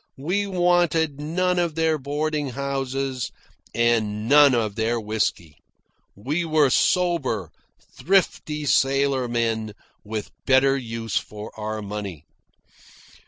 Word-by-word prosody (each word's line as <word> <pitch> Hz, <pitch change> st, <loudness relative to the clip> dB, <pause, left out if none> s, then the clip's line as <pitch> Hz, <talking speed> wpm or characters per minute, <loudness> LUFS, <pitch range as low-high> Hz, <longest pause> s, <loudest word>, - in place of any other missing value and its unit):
We 185 Hz, +9 st, -1 dB
wanted 175 Hz, -5 st, +2 dB
none 180 Hz, +4 st, 0 dB
of 170 Hz, -3 st, -1 dB
their 160 Hz, -1 st, +1 dB
boarding 145 Hz, +1 st, -2 dB
houses 135 Hz, -1 st, -3 dB, 0.4 s
and 110 Hz, -2 st, +1 dB
none 145 Hz, -1 st, +7 dB
of 110 Hz, -3 st, 0 dB
their 115 Hz, +2 st, 0 dB
whisky. 105 Hz, -7 st, -2 dB, 0.6 s
We 145 Hz, -, -2 dB
were 155 Hz, -4 st, +3 dB
sober, 140 Hz, -, +1 dB, 0.5 s
thrifty 160 Hz, -5 st, +1 dB
sailormen, 120 Hz, -5 st, +1 dB, 0.3 s
with 110 Hz, 0 st, -5 dB, 0.2 s
better 135 Hz, +1 st, +4 dB
use 115 Hz, -4 st, -3 dB
for 105 Hz, 0 st, -6 dB
our 110 Hz, 0 st, -4 dB
money. 100 Hz, -6 st, -6 dB
135 Hz, 105 wpm, -23 LUFS, 110-155 Hz, 0.6 s, none